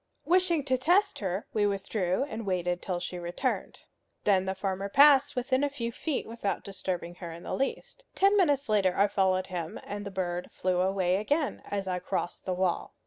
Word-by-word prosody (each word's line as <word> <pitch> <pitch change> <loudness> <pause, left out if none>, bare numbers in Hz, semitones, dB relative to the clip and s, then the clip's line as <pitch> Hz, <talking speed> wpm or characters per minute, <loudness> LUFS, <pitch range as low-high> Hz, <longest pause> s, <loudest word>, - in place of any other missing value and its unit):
Wishing 350 -3 +3
to 260 -2 0
test 370 +9 +3
her, 190 0 -2
we 205 -1 +2
withdrew 195 +2 -1
and 225 -4 -5
waited 180 -2 -1
till 180 -2 -2
she 180 0 -5
returned. 175 0 -3 0.4
Then 190 -2 +3
the 190 0 -2
farmer 195 +1 -3
passed 285 +3 +6
within 260 +2 +1
a 290 - +2
few 235 -4 -4
feet 290 +4 -3
without 225 -3 -3
disturbing 185 -3 -4
her 170 - -5
in 165 +1 -9
the - - -4
least. 385 - -3
Ten 395 +2 +4
minutes 290 -8 +3
later 200 -4 +2
I 200 - +5
followed 190 -2 +1
him, 170 -2 -4
and 205 0 -5
the 200 - -5
bird 180 -2 -3
flew 180 -1 0
away 185 -1 +2
again 285 +8 0
as 200 -1 -2
I 180 -1 -1
crossed 175 0 -3
the 185 - -1
wall. 180 -1 -1
200 Hz, 195 wpm, -29 LUFS, 185-265 Hz, 0.4 s, passed